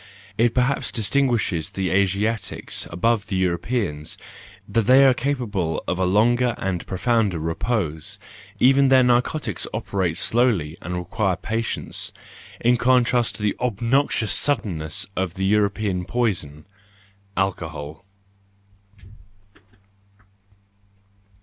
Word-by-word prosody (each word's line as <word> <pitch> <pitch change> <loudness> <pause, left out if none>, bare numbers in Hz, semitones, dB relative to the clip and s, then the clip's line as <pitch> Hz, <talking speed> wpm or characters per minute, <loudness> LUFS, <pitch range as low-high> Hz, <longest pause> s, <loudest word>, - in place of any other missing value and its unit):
It 115 +2 +2
perhaps 125 0 +1
distinguishes 115 - 0
the 95 -2 -2
Asiatics 100 +2 0
above 100 +4 0
the 95 -2 -1
Euro¬ 85 -2 -1
peans, 90 -12 -3 0.5
that 115 -2 +1
they 135 +2 +7
are 130 - +6
capable 120 - -2
of 90 - -1
a 95 - +2
longer 120 +5 +3
and 90 -3 -3
pro¬ 95 - -4
founder 110 -4 +1
repose; 80 +1 -2 0.4
even 135 +1 +5
their 130 -1 +6
narcotics 125 - 0
operate 90 -4 -1
slowly 100 -8 +1
and 90 - -4
require 90 +2 -1
patience, 115 +5 -3 0.5
in 120 +1 +3
contrast 125 -1 +2
to 105 - -7
the 105 - +1
obnoxious 120 -1 0
suddenness 100 - -1
of 95 -2 -2
the 95 - -1
European 100 -2 +1
poison, 90 -12 -2 0.7
alcohol. 80 -4 -3
105 Hz, 110 wpm, -23 LUFS, 90-120 Hz, 0.7 s, they